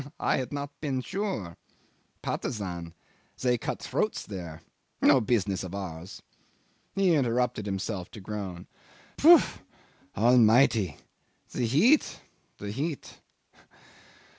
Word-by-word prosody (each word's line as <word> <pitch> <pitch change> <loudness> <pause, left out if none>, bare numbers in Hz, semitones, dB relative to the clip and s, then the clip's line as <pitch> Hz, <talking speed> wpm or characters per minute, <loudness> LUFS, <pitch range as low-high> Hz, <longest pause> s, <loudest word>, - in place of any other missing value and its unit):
I - - +1
had 130 -2 -3
not 145 0 -4
been 135 -4 -1
sure. 130 - -4 0.7
Patusan 90 -6 -4 0.5
they 125 -1 +2
cut - - -3
throats 215 - -1
there 85 -5 -8 0.4
no 130 - +5
business 100 -4 0
of 95 +1 -6
ours." 90 -1 -7 0.7
He 195 -3 +3
interrupted 125 -6 +1
himself 95 -1 -3
to - - -8
groan. 95 -3 -6 0.5
"Phoo! 335 +3 +9 0.8
Almighty! 115 - +4 0.5
The 120 - -1
heat! 220 - +3 0.4
The 100 0 -6
heat! 145 +6 -4
110 Hz, 105 wpm, -28 LUFS, 95-135 Hz, 0.8 s, Phoo